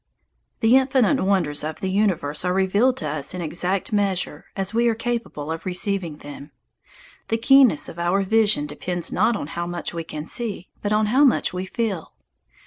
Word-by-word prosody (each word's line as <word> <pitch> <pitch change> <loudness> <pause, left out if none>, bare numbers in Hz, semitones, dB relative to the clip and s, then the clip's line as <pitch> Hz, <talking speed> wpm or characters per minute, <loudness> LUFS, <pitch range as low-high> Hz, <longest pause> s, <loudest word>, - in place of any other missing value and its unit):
The 230 +3 +6
infinite 265 0 +2
wonders 175 -7 +1
of 155 0 -4
the 190 - -2
universe 180 -8 0
are 180 0 +1
revealed 200 +7 +2
to 155 - -3
us 150 +3 -3
in 180 - -4
exact 180 +6 -2
measure 190 -7 -1
as 195 +1 -3
we 235 +1 +3
are 230 - +2
capable 230 -10 -3
of 165 - -4
receiving 180 -3 -2
them. 145 0 -10 0.8
The 225 - 0
keenness 255 - +5
of 170 - -9
our 175 +3 +1
vision 210 -6 +2
depends 175 +4 -4
not 220 +5 +2
on 205 - -4
how 175 0 -3
much 175 -1 -3
we 165 -1 -4
can 155 -1 -7
see, 210 -3 -4
but 205 - -2
on 215 0 +3
how 275 +3 +5
much 265 -8 +3
we 185 +1 -4
feel. 205 -6 -3
190 Hz, 185 wpm, -23 LUFS, 165-225 Hz, 0.8 s, The